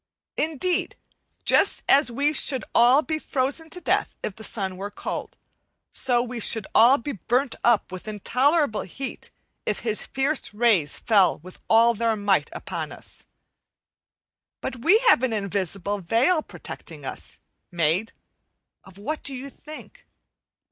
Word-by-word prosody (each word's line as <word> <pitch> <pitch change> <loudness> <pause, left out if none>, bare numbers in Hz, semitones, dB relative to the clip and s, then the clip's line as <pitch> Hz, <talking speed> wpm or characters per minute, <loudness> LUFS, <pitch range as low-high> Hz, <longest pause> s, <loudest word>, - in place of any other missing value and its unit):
Indeed, 320 +3 -1 0.5
just - - +3
as 280 -1 +5
we 285 +5 +1
should 260 -5 +2
all 250 +5 +5
be 315 0 -2
frozen 285 +3 -1
to 360 - -5
death - - 0
if 200 - -4
the 220 - -11
sun 190 -4 -3
were 200 +2 -6
sold, - - -5 0.5
so 245 -2 +1
we 245 -1 -6
should 220 -1 +1
all 245 +5 +7
be 285 +3 -5
burnt 250 +4 0
up 235 -6 +3
with 185 +3 -8
intolerable 250 - +1
heat 270 +9 -6 0.3
if - - -2
his 220 -3 -1
fierce 270 -4 -2
rays 210 -10 +2
fell 200 -5 +3
with 185 0 -12
all 230 +1 +5
their 230 0 0
might 205 -2 +1
upon - - -5
us. - - -13 1.3
But 260 - -5
we 340 - +5
have 455 - +6
an 260 -3 0
invisible 200 -1 -2
veil 235 - +2
protecting - - -10
us, - - -7 0.3
made 175 +5 0 0.7
of 190 -1 -16
what 300 +10 -4
do 275 - -3
you 270 +2 -8
think? 310 - -13
235 Hz, 145 wpm, -24 LUFS, 205-280 Hz, 1.3 s, all